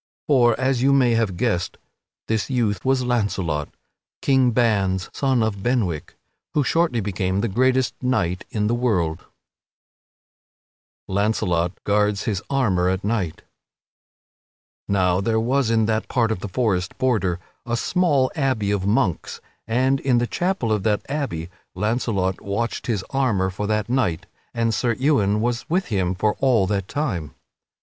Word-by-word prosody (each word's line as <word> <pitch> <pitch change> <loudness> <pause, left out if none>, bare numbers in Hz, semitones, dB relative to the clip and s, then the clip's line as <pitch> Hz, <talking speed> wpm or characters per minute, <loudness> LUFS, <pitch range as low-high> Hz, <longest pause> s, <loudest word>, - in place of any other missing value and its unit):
For, 120 -5 +3
as 130 -2 +1
you 135 +2 +4
may 130 -3 +4
have 115 -6 0
guessed, 95 -5 -1 0.5
this 110 +2 -1
youth 115 -7 0
was 130 -1 +2
Launcelot, 100 - -1 0.5
King 130 -2 +4
Ban's 100 -6 +1
son 130 -4 +1
of 105 -3 -2
Benwick, 100 - -1 0.4
who 150 - +3
shortly 160 -5 +1
became 95 -1 -1
the 115 - 0
greatest 130 +4 +2
knight 100 -9 0
in 105 -1 -1
the 110 - +1
world. 95 -10 0 1.9
[Sidenote: - - -79
Launcelot 95 -3 0
guards 105 0 +1
his 100 -3 -1
armor 100 -10 +2
at 95 +1 -1
night] 100 -7 -2 1.4
Now 90 -2 +2
there 110 +2 +1
was 125 +2 +1
in 110 -1 +3
that 110 0 -1
part 115 -3 +1
of 110 - -2
the 100 - -6
forest 95 -4 -1
border 105 -9 +1 0.3
a 120 0 0
small 145 -5 +2
abbey 130 -9 0
of 100 -1 -1
monks, 100 -4 0 0.3
and 130 +4 +2
in 130 -3 +2
the 120 - +2
chapel 175 - -1
of 105 -2 +1
that 105 0 0
abbey 135 - -3 0.3
Launcelot 100 -2 -1
watched 115 +6 -3
his 105 -6 -1
armor 110 -9 +1
for 100 +2 -4
that 105 0 0
night 120 -10 0 0.3
and 115 -1 0
Sir 120 +2 +1
Ewain 105 -7 +2
was 120 +5 -2
with 180 +1 0
him 95 -4 0
for 105 +3 +1
all 125 -7 +3
that 100 -1 -1
time. 100 - -3
110 Hz, 150 wpm, -22 LUFS, 95-125 Hz, 1.9 s, you